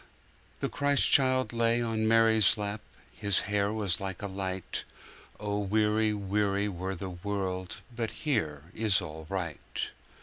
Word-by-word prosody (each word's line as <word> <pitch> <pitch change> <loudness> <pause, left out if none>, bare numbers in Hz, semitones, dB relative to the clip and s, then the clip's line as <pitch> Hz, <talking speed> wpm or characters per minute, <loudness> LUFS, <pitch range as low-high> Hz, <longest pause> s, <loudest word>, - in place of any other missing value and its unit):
The - - +1
Christ 145 0 +3
child 130 -2 +4
lay 115 0 +3
on 110 -2 0
Mary's 110 -2 +5
lap, 105 0 -3 0.3
His 100 -2 +2
hair 100 0 0
was 100 -5 0
like 95 0 -5
a - - -1
light.(O 95 +2 -5
weary, 105 +1 +2
weary 100 0 0
were 95 0 -4
the 95 +1 -5
world, 95 0 -3 0.2
But 115 -2 -1 0.2
here 80 - 0
is 110 -3 +3
all 80 -3 -7
aright.) 90 -6 -4
100 Hz, 135 wpm, -29 LUFS, 95-110 Hz, 0.3 s, Mary's